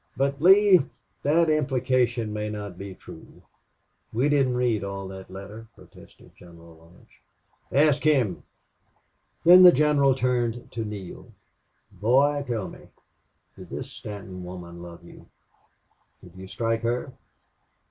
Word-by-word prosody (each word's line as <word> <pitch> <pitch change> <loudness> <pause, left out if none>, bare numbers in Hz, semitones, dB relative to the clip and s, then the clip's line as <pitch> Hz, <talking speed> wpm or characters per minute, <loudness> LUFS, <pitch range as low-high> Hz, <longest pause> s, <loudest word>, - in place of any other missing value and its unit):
"But, 140 +1 -1
Lee 190 +1 +6 0.4
that 165 +4 +2
implication 130 -6 0
may 105 0 -3
not 105 -3 -7
be 95 +1 -9
true. - - -15 0.7
We 125 +6 0
didn't 135 -4 +2
read 120 -5 0
all 100 -1 -6
that 95 -1 -10
letter," 100 +4 -10
protested - - -18
General 85 -1 -16
Lodge. 85 +2 -22 0.5
"Ask 145 0 +3
him." 130 - +1 1.0
Then 180 +2 +9
the 180 -1 +10
general 140 -2 +3
turned 120 -2 -2
to 115 - -4
Neale. 105 -4 -9 0.6
"Boy 140 +6 +2
tell 115 -6 -3
me - - -13 0.7
did - - -13
this - - -7
Stanton 95 -3 -9
woman 90 -1 -9
love 85 0 -11
you 85 - -15 1.0
did 90 - -15
you 95 0 -10
strike 115 +2 -2
her? 120 +3 -3
115 Hz, 125 wpm, -25 LUFS, 95-140 Hz, 1.0 s, the